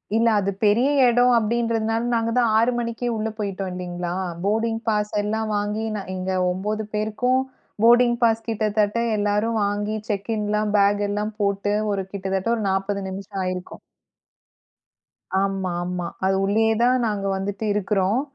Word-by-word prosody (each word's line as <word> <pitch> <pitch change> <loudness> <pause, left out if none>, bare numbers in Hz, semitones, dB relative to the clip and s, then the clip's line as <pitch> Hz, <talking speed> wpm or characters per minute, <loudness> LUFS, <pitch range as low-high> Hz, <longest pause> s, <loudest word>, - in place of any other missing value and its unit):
இல்ல 230 +1 +3
அது 200 0 0
பெரிய 235 +7 +4 0.2
எடம். 245 +1 +4
அப்டின்றதுனால 225 0 0
நாங்க 230 0 +1
தான் 235 -2 +3
6 230 +3 +3
மணிக்கே 235 +1 -3
உள்ள 220 +1 -1
போயிட்டோம் 195 -2 -3
இல்லீங்களா. 175 -1 -4 0.3
போடிங் 225 +2 0
பாஸ் 210 -1 0
எல்லாம் 220 +1 -1
வாங்கி 210 +2 -2
ந 200 - -3
இங்க 185 +1 -3 0.2
9 210 +4 -3
பேருக்கும் 235 +5 +1 0.4
போடிங் 240 +1 +5
பாஸ் 225 -1 +2
கிட்டதட்ட 215 -1 0 0.2
எல்லாரும் 210 +2 +1
வாங்கி 205 +1 -1
செக்கின்லாம் 210 0 -1
பேக் 205 +1 +3
எல்லாம் 210 +1 -2
போட்டு. 200 0 0 0.2
ஒரு 195 -1 -1
கிட்டதட்ட 190 +1 -2
ஒரு 225 - -3
40 195 +1 -1
நிமிஷம் 195 +1 -6
ஆயிருக்கும். 185 0 -5 1.6
ஆமா, 195 -2 -1
ஆமா. 180 -1 -3 0.2
அது 190 0 +2
உள்ளயே 220 +2 +2
தான் 250 +1 +4
நாங்க 205 -2 -2
வந்துட்டு 200 +3 -3
இருக்கிறோம். 205 +3 +1
210 Hz, 140 wpm, -23 LUFS, 195-225 Hz, 1.6 s, போடிங்